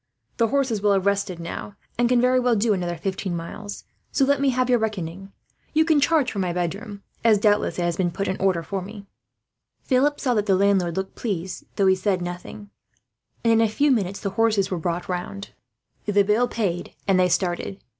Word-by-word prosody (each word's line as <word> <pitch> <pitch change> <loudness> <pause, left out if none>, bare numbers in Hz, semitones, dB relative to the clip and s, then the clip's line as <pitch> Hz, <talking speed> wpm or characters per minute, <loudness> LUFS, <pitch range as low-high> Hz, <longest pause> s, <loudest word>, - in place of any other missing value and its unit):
The 230 - +3
horses 255 -4 0
will 205 -1 +3
have 195 -1 +1
rested 200 -3 0
now, 170 +4 -6 0.2
and 240 0 +2
can 250 -1 +4
very 250 +1 +4
well 245 -2 +2
do 215 +1 +2
another 175 -3 -2
fifteen 185 +1 -3
miles; 200 +5 -7 0.3
so 275 - +3
let 280 0 +2
me 280 - +3
have 255 0 +1
your 245 -1 +3
reckoning. 195 -3 -4 0.4
You 315 0 +4
can 315 -3 +3
charge 295 -4 +2
for 200 - -4
my 180 -2 0
bedroom 200 +4 -4 0.2
as, 225 -2 +5
doubtless, 210 0 +2
it 175 - 0
has 170 -1 -1
been 180 -2 +1
put 195 +4 -3
in 190 - 0
order 185 -3 +2
for 195 +3 -3
me." 200 +2 -9 0.8
Philip 280 +3 +2
saw 255 -3 +1
that 210 -2 0
the 195 - +4
landlord 190 -3 +2
looked 190 0 -3
pleased, 190 -5 -4
though 200 - +2
he 190 - +6
said 190 0 0
nothing; 180 +4 -7 0.7
and 230 -1 +4
in 225 - +4
a 225 - +3
few 285 +7 +2
minutes 200 -5 0
the 200 - -3
horses 210 -2 +1
were 180 - -1
brought 170 +1 -2
round, 185 +2 -5 0.6
the 205 -1 +4
bill 215 +5 +2
paid, 190 -8 -3
and 190 -2 +4
they 180 0 +4
started. 180 +2 -1
200 Hz, 210 wpm, -24 LUFS, 185-230 Hz, 0.8 s, he